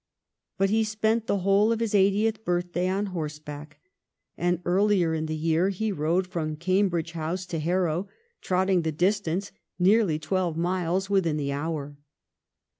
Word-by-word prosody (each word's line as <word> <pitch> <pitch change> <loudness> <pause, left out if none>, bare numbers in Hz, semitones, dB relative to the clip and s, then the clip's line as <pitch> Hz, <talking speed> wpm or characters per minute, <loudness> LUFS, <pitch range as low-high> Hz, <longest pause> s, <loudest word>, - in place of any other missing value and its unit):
But 195 +1 +2
he 220 +1 +3
spent 220 +1 0
the 200 - +1
whole 200 +4 +3
of 230 - 0
his 230 -2 -1
eightieth 205 +2 +2
birth 175 -2 -1
day 180 +1 0
on 195 +2 0
horseback; 150 -2 -6 0.6
and 175 0 0
earlier 185 -2 +2
in 160 0 -2
the 155 - -2
year 165 +4 +1
he 210 +3 -2
rode 175 +2 0
from 160 -4 -3
Cambridge 175 -1 0
House 170 +3 -3
to 170 -3 -4
Harrow, 175 +2 0 0.3
trotting 185 0 +2
the 160 -1 -1
dis 185 +7 +2
tance, 190 +2 -3 0.3
nearly 190 -2 +3
twelve 170 +1 -1
miles, 180 +2 0
within 170 -6 +2
the 140 -2 -2
hour. 145 -1 -4
180 Hz, 160 wpm, -26 LUFS, 160-195 Hz, 0.6 s, he